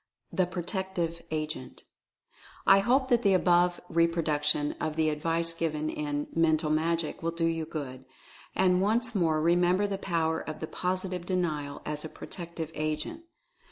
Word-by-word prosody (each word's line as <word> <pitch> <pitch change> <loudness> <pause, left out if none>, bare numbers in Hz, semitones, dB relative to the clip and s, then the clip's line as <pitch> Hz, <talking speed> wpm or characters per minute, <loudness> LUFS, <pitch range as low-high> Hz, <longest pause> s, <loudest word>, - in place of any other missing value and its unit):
THE 185 -2 +2
PROTECTIVE 175 -2 -2
AGENT. 155 -4 -4 0.8
I 195 - +7
hope 260 +6 +2
that 240 -1 +4
the 200 -4 +4
above 175 -1 +3
reproduction 155 -3 +2
of 155 - -1
the 155 -1 +2
advice 165 +2 0
given 155 -2 -1
in 145 -1 -2
"Mental 160 -2 +2
Magic" 165 +1 0
will 165 - 0
do 165 0 -1
you 165 -1 0
good. 130 -5 -6 0.5
And 185 -1 +3
once 225 +4 +1
more 165 -6 +2
remember 175 +4 +3
the 200 -1 -2
power 165 -4 0
of 155 - -6
the - - -3
POSITIVE 180 +1 -3
DENIAL 155 -6 -2
as 150 0 -3
a 155 - -5
Protective 165 -2 -7
Agent. 155 - -3
165 Hz, 150 wpm, -29 LUFS, 155-180 Hz, 0.8 s, I